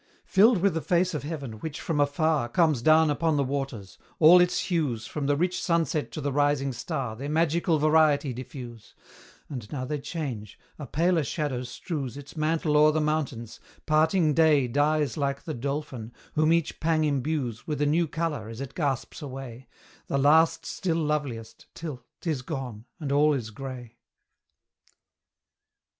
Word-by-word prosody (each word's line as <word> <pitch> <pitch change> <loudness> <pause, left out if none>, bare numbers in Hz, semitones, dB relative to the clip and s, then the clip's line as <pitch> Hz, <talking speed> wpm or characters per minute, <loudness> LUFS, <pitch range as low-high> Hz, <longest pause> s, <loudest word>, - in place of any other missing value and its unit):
Filled 200 -1 +4
with 200 - +3
the 165 - -2
face 180 +2 +1
of 150 - -2
heaven, 140 -8 -6
which, 155 +4 -5
from 160 -3 -2
afar, 145 -2 +1
Comes 155 -2 +2
down 155 +3 +5
upon 160 +1 +1
the 140 - +2
waters; 135 -7 -4 0.2
all 170 +3 +8
its 180 0 +2
hues, 145 - -1
From 145 +2 -4
the 145 - +3
rich 180 +4 0
sunset 165 -2 0
to - - -4
the 145 0 -1
rising 145 -1 +1
star, 125 -2 -4
Their 140 +5 -6
magical 165 +1 +2
variety 150 -2 +3
diffuse: 120 -2 -9 0.5
And 120 -6 -7
now 130 -3 -3
they 150 +2 -3
change; 135 - -5 0.2
a 145 - -6
paler 170 +4 +2
shadow 145 -4 -2
strews 135 +1 -5
Its 145 +1 -11
mantle 155 -1 +1
o'er 150 +1 +6
the 155 - 0
mountains; 140 -7 -2 0.3
parting 155 +1 +3
day 150 -4 +4
Dies 145 +4 +1
like 140 -1 -1
the 155 - -4
dolphin, 130 -3 -4 0.2
whom 155 +1 +3
each 165 -1 0
pang 160 -1 +1
imbues 140 -5 -2
With 150 -2 -2
a 145 - +2
new 160 +3 +2
colour 155 - -3
as 115 +1 -8
it 135 -1 -6
gasps 140 -2 -2
away, 130 -3 -8 0.4
The 140 - 0
last 160 +4 +4
still 170 -4 -2
loveliest, 145 -8 -3
till 150 -7 -6 0.2
'tis 155 -6 -2
gone 125 -6 -6
and 145 -4 -4
all 150 +1 +4
is 115 -5 -4
grey. 125 -1 -8
145 Hz, 165 wpm, -27 LUFS, 130-160 Hz, 0.5 s, all